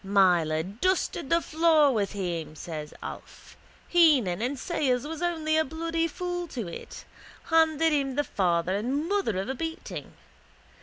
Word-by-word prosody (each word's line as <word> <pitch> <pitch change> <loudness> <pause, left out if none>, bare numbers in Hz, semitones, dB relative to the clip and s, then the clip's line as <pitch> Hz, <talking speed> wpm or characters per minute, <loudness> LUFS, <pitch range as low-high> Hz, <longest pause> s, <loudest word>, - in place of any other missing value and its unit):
—Myler 175 -5 +3
dusted 275 - -1
the 335 0 +3
floor 315 -3 +4
with 205 -3 -1
him, 170 -6 -4
says 155 -2 -6
Alf. - - -10 0.3
Heenan 275 - +4
and 260 +4 -1
Sayers 260 -4 0
was 320 +1 -6
only 320 -3 0
a 315 - +4
bloody 330 +2 -2
fool 355 +1 -4
to 240 - -5
it. 170 - -9 0.5
Handed 320 -1 +4
him 275 -3 0
the 290 - +2
father 180 -6 0
and 265 +9 -1
mother 390 - 0
of 190 +3 -2
a 265 - -1
beating. 325 +4 -6
280 Hz, 150 wpm, -27 LUFS, 195-325 Hz, 0.5 s, floor